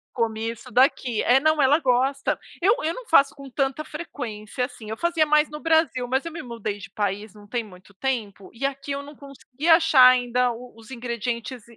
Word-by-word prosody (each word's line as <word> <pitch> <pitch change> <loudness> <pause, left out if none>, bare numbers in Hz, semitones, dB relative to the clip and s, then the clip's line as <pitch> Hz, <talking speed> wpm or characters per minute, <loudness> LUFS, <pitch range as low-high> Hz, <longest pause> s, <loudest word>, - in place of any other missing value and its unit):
Comia 225 -1 -1
isso 235 +2 -14
daqui. 250 -2 +2
É, 250 +2 +5
não, 310 +1 +2
ela 285 +4 +4
gosta. 265 +1 +1 0.2
Eu 400 +6 +4
eu 320 - 0
não - - -9
faço 280 -4 +5
com 275 -2 -11
tanta 270 +3 -1
frequência, 250 -8 -5
assim. 225 -4 -11
Eu 220 - -3
fazia 340 -2 +2
mais 300 0 +3
no 300 - -7
Brasil. 320 -6 +1
Mas 265 +2 0
eu 335 - -5
me 330 - -7
mudei 230 -4 -5
de 200 - -11
país 205 0 -3
não 205 -1 -16
tem 235 +2 -2
muito 185 -1 -16
tempo 210 -5 -3
e 230 +4 -9
aqui 275 +1 -4
eu 280 0 -2
não 290 +1 -12
consegui 275 +1 -8
achar 325 -6 +7
ainda 250 0 +3
o 240 +1 -10
os 225 +2 -15
ingredientes 235 0 -4
255 Hz, 205 wpm, -24 LUFS, 230-290 Hz, 0.2 s, achar